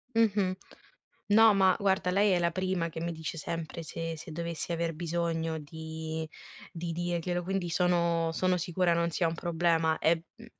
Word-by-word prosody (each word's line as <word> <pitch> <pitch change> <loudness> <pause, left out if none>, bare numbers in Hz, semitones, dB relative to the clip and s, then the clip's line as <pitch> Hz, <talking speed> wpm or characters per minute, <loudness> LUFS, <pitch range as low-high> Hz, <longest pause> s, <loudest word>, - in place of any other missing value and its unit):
Mh-mh. 200 -4 +3 0.7
No, 220 0 +7
ma 190 -1 +5
guarda 190 -2 +1
lei 200 +1 +3
è 180 - +3
la 170 0 +2
prima 185 -1 -1
che 160 - -6
mi 170 +1 -2
dice 160 0 -5
sempre 165 +1 -4
se 165 +1 -4
se 160 +2 -9
dovessi 170 +1 -4
aver 165 0 -1
bisogno, 165 -1 -1
di 160 +1 -6 0.4
di 170 0 -4
dirglielo, 175 +1 -1
quindi 185 -1 -2
sono 170 -2 +2
sono 185 +2 +1
sicura 175 0 +1
non 170 0 +2
sia 170 +1 +1
un 165 - 0
problema. 165 -1 +1
E, 165 +1 +2
mhmm, - - -13
170 Hz, 170 wpm, -30 LUFS, 165-180 Hz, 0.7 s, No